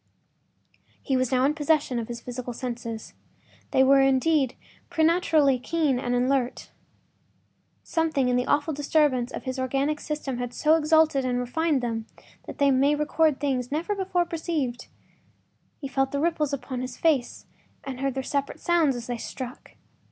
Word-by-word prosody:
He 270 Hz, -, 0 dB
was 255 Hz, -1 st, +1 dB
now 255 Hz, 0 st, +3 dB
in 285 Hz, -, +3 dB
full 300 Hz, -, -7 dB
possession 295 Hz, -4 st, +1 dB
of 225 Hz, -, -4 dB
his 235 Hz, -1 st, -6 dB
physical 245 Hz, 0 st, -6 dB
senses. 235 Hz, -2 st, -6 dB, 0.6 s
They 265 Hz, -, +4 dB
were, 275 Hz, +1 st, +6 dB
indeed, 270 Hz, 0 st, +2 dB, 0.3 s
preternaturally 320 Hz, -5 st, +3 dB
keen 295 Hz, -2 st, 0 dB
and 245 Hz, -1 st, -1 dB
alert. 250 Hz, 0 st, 0 dB, 1.1 s
Something 315 Hz, -6 st, 0 dB
in 250 Hz, -, +2 dB
the 250 Hz, 0 st, 0 dB
awful 295 Hz, +2 st, +1 dB
disturbance 285 Hz, -4 st, +1 dB
of -, -, -6 dB
his 260 Hz, 0 st, -4 dB
organic 275 Hz, +4 st, 0 dB
system 290 Hz, -5 st, -4 dB
had 245 Hz, -1 st, -4 dB
so 310 Hz, +1 st, +4 dB
exalted 315 Hz, -3 st, +3 dB
and 250 Hz, -1 st, 0 dB
refined 280 Hz, +4 st, 0 dB
them 225 Hz, -2 st, -3 dB, 0.4 s
that -, -, -8 dB
they 280 Hz, -1 st, +4 dB
made 275 Hz, +3 st, +3 dB
record 300 Hz, 0 st, +2 dB
of -, -, -26 dB
things 260 Hz, -3 st, -1 dB
never 330 Hz, +8 st, -1 dB
before 380 Hz, -3 st, 0 dB
perceived. 315 Hz, -7 st, -3 dB, 0.9 s
He 275 Hz, -, -5 dB
felt 270 Hz, 0 st, 0 dB
the 280 Hz, -, -1 dB
ripples 305 Hz, -2 st, 0 dB
upon 255 Hz, -2 st, -4 dB
his 255 Hz, -1 st, -6 dB
face 290 Hz, -7 st, 0 dB, 0.4 s
and 265 Hz, -2 st, -6 dB
heard 275 Hz, -1 st, -1 dB
their 265 Hz, -, -2 dB
separate 280 Hz, +1 st, -2 dB
sounds 330 Hz, -6 st, +2 dB
as 240 Hz, -1 st, -6 dB
they 245 Hz, 0 st, -3 dB
struck. 255 Hz, +1 st, -8 dB
275 Hz, 165 wpm, -26 LUFS, 250-305 Hz, 1.1 s, were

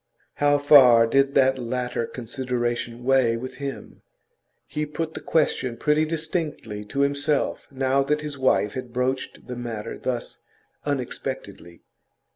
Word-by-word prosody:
How 145 Hz, 0 st, +4 dB
far 130 Hz, -5 st, +7 dB
did 135 Hz, +4 st, +2 dB
that 130 Hz, -1 st, +4 dB
latter 125 Hz, -1 st, -2 dB
consideration 120 Hz, -1 st, -3 dB
weigh 125 Hz, -3 st, +3 dB
with 130 Hz, +2 st, -7 dB
him? 140 Hz, 0 st, -7 dB, 0.6 s
He 150 Hz, 0 st, -3 dB
put 160 Hz, +1 st, -4 dB
the -, -, -5 dB
question 130 Hz, -6 st, 0 dB
pretty 150 Hz, +5 st, +2 dB
distinctly 155 Hz, -, -3 dB
to 140 Hz, +7 st, -2 dB
himself 140 Hz, +1 st, 0 dB
now 135 Hz, 0 st, +1 dB
that 150 Hz, +2 st, 0 dB
his 150 Hz, -1 st, -5 dB
wife 130 Hz, -6 st, +2 dB
had 125 Hz, -2 st, -6 dB
broached 130 Hz, +1 st, -2 dB
the 125 Hz, -, -6 dB
matter 115 Hz, -3 st, -5 dB
thus 125 Hz, -2 st, -4 dB, 0.5 s
unexpectedly. 125 Hz, -, -5 dB
130 Hz, 130 wpm, -24 LUFS, 120-145 Hz, 0.6 s, far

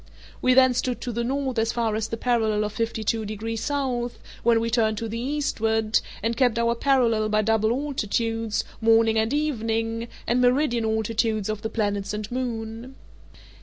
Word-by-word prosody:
We 255 Hz, 0 st, +4 dB
then 260 Hz, -1 st, +6 dB
stood 250 Hz, 0 st, -1 dB
to 245 Hz, -, -3 dB
the 235 Hz, +1 st, -2 dB
north 265 Hz, -1 st, -1 dB
as 225 Hz, +1 st, +1 dB
far 230 Hz, -2 st, 0 dB
as 220 Hz, 0 st, -1 dB
the 225 Hz, -, -4 dB
parallel 220 Hz, -3 st, +1 dB
of 210 Hz, 0 st, -3 dB
fifty 225 Hz, 0 st, -2 dB
two 225 Hz, +1 st, 0 dB
degrees 215 Hz, +2 st, -4 dB
south, 255 Hz, -4 st, -2 dB, 0.2 s
when 235 Hz, -1 st, +4 dB
we 230 Hz, 0 st, -1 dB
turned 220 Hz, -2 st, +2 dB
to 230 Hz, +1 st, -3 dB
the 225 Hz, +1 st, -4 dB
eastward, 225 Hz, -5 st, 0 dB, 0.2 s
and 230 Hz, +1 st, 0 dB
kept 245 Hz, -2 st, +2 dB
our 235 Hz, 0 st, +2 dB
parallel 235 Hz, -4 st, +2 dB
by 215 Hz, 0 st, +2 dB
double 220 Hz, 0 st, +2 dB
altitudes, 230 Hz, -4 st, -1 dB, 0.2 s
morning 225 Hz, 0 st, +4 dB
and 220 Hz, +1 st, 0 dB
evening, 230 Hz, -6 st, -1 dB, 0.2 s
and 245 Hz, +1 st, +2 dB
meridian 245 Hz, -2 st, +2 dB
altitudes 220 Hz, -1 st, 0 dB
of 215 Hz, -1 st, -3 dB
the 220 Hz, -, -3 dB
planets 205 Hz, -2 st, -1 dB
and 210 Hz, +1 st, -5 dB
moon. 240 Hz, 0 st, -4 dB
225 Hz, 175 wpm, -25 LUFS, 220-245 Hz, 0.2 s, then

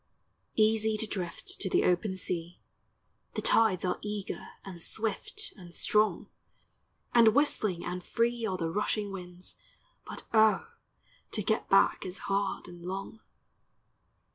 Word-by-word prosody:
Easy 220 Hz, 0 st, +3 dB
to 220 Hz, -, +1 dB
drift 180 Hz, -5 st, -4 dB
to 190 Hz, -, 0 dB
the -, -, +3 dB
open 190 Hz, +2 st, +1 dB
sea, 175 Hz, -2 st, -2 dB, 0.8 s
The -, -, -1 dB
tides 210 Hz, -6 st, +4 dB
are 180 Hz, -, 0 dB
eager 210 Hz, -1 st, -4 dB, 0.2 s
and 180 Hz, -3 st, -8 dB
swift 230 Hz, -, -2 dB
and 175 Hz, -3 st, -11 dB
strong, 215 Hz, 0 st, +2 dB, 0.9 s
And 230 Hz, -2 st, +6 dB
whistling 215 Hz, -, +2 dB
and 180 Hz, 0 st, -4 dB
free 235 Hz, +3 st, 0 dB
are 190 Hz, -2 st, -1 dB
the 165 Hz, -2 st, -2 dB
rushing 210 Hz, +1 st, 0 dB
winds, 180 Hz, -1 st, -7 dB, 0.5 s
But -, -, -6 dB
O, 220 Hz, -, +4 dB, 0.6 s
to 210 Hz, -, 0 dB
get 220 Hz, +3 st, 0 dB
back 195 Hz, -, +4 dB
is 185 Hz, +1 st, -4 dB, 0.2 s
hard 200 Hz, -2 st, -1 dB
and 175 Hz, -1 st, -11 dB
long. 195 Hz, +4 st, -5 dB
200 Hz, 135 wpm, -30 LUFS, 180-220 Hz, 0.9 s, And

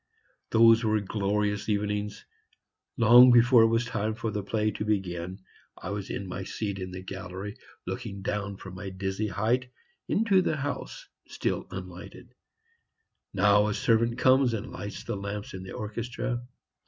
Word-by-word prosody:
Those 115 Hz, +1 st, +6 dB
were 110 Hz, -1 st, +2 dB
glorious 105 Hz, +1 st, -1 dB
evenings. 105 Hz, 0 st, -2 dB, 0.7 s
Long 120 Hz, +2 st, +8 dB
before 120 Hz, 0 st, +6 dB
it 115 Hz, -, +6 dB
was 115 Hz, +1 st, +1 dB
time 110 Hz, -2 st, -2 dB
for 115 Hz, -2 st, -3 dB
the 105 Hz, -, -2 dB
play 105 Hz, +2 st, 0 dB
to 105 Hz, -, -4 dB
begin, 95 Hz, -4 st, -2 dB, 0.4 s
I 95 Hz, -, -6 dB
was 100 Hz, -1 st, -4 dB
in 100 Hz, -, -4 dB
my 95 Hz, +1 st, -5 dB
seat 100 Hz, 0 st, -4 dB
in 95 Hz, 0 st, -5 dB
the 90 Hz, 0 st, -8 dB
gallery, 95 Hz, +2 st, -6 dB, 0.3 s
looking 105 Hz, -6 st, -5 dB
down 100 Hz, -1 st, -3 dB
from 95 Hz, -1 st, -10 dB
my 95 Hz, +1 st, -6 dB
dizzy 95 Hz, +3 st, -3 dB
height, 120 Hz, +5 st, 0 dB, 0.4 s
into 200 Hz, -3 st, +3 dB
the 160 Hz, -3 st, 0 dB
house, 150 Hz, -, -5 dB, 0.2 s
still -, -, -2 dB
unlighted. -, -, -9 dB, 1.0 s
Now 105 Hz, 0 st, +4 dB
a 105 Hz, -, -1 dB
servant 115 Hz, 0 st, +2 dB
comes 130 Hz, -2 st, +4 dB
and 115 Hz, +3 st, -6 dB
lights 105 Hz, 0 st, -7 dB
the -, -, -3 dB
lamps 100 Hz, +1 st, -5 dB
in 95 Hz, -, -6 dB
the 95 Hz, -, -8 dB
orchestra. 120 Hz, +3 st, -4 dB
105 Hz, 155 wpm, -28 LUFS, 100-115 Hz, 1.0 s, Long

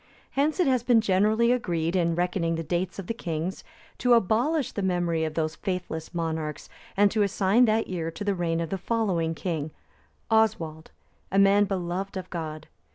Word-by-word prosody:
Hence 295 Hz, +5 st, 0 dB
it 360 Hz, -, +4 dB
has 260 Hz, -3 st, +2 dB
been 240 Hz, -1 st, +4 dB
generally 215 Hz, +3 st, +3 dB
agreed, 170 Hz, -8 st, 0 dB
in 170 Hz, -2 st, +2 dB
reckoning 175 Hz, -1 st, 0 dB
the 165 Hz, -, -3 dB
dates 175 Hz, +2 st, -2 dB
of 195 Hz, -, -5 dB
the 230 Hz, -, -2 dB
kings, 170 Hz, -4 st, -4 dB, 0.4 s
to 245 Hz, -1 st, +5 dB
abolish 240 Hz, -, +1 dB
the 205 Hz, -, -4 dB
memory 175 Hz, -3 st, 0 dB
of 155 Hz, -1 st, -4 dB
those 155 Hz, -1 st, -1 dB
faithless 180 Hz, -4 st, -4 dB
monarchs, 160 Hz, -3 st, -3 dB, 0.3 s
and 205 Hz, 0 st, +5 dB
to 220 Hz, -, +1 dB
assign 200 Hz, +4 st, +3 dB
that 220 Hz, 0 st, +2 dB
year 170 Hz, -3 st, -3 dB
to 165 Hz, +6 st, -6 dB
the 205 Hz, -1 st, +1 dB
reign 170 Hz, -2 st, -1 dB
of 165 Hz, -, -4 dB
the 195 Hz, -, -2 dB
following 185 Hz, -7 st, 0 dB
king, 160 Hz, -3 st, -3 dB, 0.6 s
Oswald, 165 Hz, -8 st, +1 dB, 0.4 s
a 195 Hz, -, +1 dB
man 200 Hz, +1 st, +5 dB
beloved 190 Hz, 0 st, -3 dB
of 185 Hz, -1 st, -5 dB
God. 155 Hz, -2 st, -5 dB
185 Hz, 180 wpm, -26 LUFS, 165-215 Hz, 0.6 s, to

